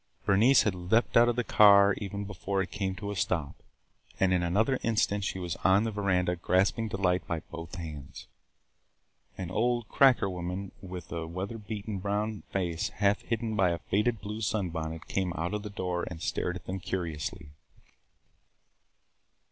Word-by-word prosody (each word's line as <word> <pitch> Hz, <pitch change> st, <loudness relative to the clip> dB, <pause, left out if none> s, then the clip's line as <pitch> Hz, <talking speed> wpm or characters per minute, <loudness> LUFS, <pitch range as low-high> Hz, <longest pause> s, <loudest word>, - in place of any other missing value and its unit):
Bernice 115 Hz, +7 st, +5 dB
had 105 Hz, -, +1 dB
leaped 90 Hz, +6 st, +1 dB
out 120 Hz, +1 st, +7 dB
of 120 Hz, -, 0 dB
the 125 Hz, -, 0 dB
car 100 Hz, -2 st, +7 dB
even 100 Hz, 0 st, -4 dB
before 100 Hz, 0 st, -3 dB
it 90 Hz, -, -9 dB
came 95 Hz, -2 st, -2 dB
to 100 Hz, +1 st, -5 dB
a -, -, -4 dB
stop, 85 Hz, -5 st, -2 dB, 0.6 s
and 95 Hz, -1 st, +3 dB
in 90 Hz, -, +2 dB
another 105 Hz, +9 st, +1 dB
instant 105 Hz, -3 st, +1 dB
she 95 Hz, -, -2 dB
was 90 Hz, -3 st, -3 dB
on 95 Hz, +2 st, +4 dB
the 115 Hz, -, -1 dB
veranda 90 Hz, -4 st, +1 dB
grasping 95 Hz, +6 st, +1 dB
Delight 95 Hz, -3 st, 0 dB
by 85 Hz, -2 st, -2 dB
both 85 Hz, +1 st, -7 dB
hands. 75 Hz, -6 st, -8 dB, 1.1 s
An 90 Hz, -2 st, -5 dB
old 120 Hz, +2 st, +1 dB
"cracker" 130 Hz, -7 st, +5 dB
woman 90 Hz, +1 st, -4 dB
with 90 Hz, -2 st, -8 dB
a 80 Hz, -1 st, -4 dB
weather 95 Hz, +7 st, -5 dB
beaten 105 Hz, -1 st, -5 dB
brown 105 Hz, +2 st, -2 dB
face 85 Hz, -4 st, -1 dB
half 100 Hz, -1 st, +2 dB
hidden 115 Hz, -1 st, -2 dB
by 95 Hz, -4 st, +3 dB
a 85 Hz, -, 0 dB
faded 105 Hz, -, 0 dB
blue 105 Hz, +2 st, -5 dB
sunbonnet 80 Hz, -7 st, -2 dB
came 95 Hz, -2 st, -1 dB
out 85 Hz, +4 st, -3 dB
of 105 Hz, -, -2 dB
the 105 Hz, -, -6 dB
door 90 Hz, -3 st, -3 dB
and 90 Hz, -, -7 dB
stared 90 Hz, +2 st, -2 dB
at 90 Hz, -, -9 dB
them 95 Hz, +1 st, -4 dB
curiously. 80 Hz, -5 st, -4 dB
95 Hz, 170 wpm, -29 LUFS, 90-105 Hz, 1.1 s, out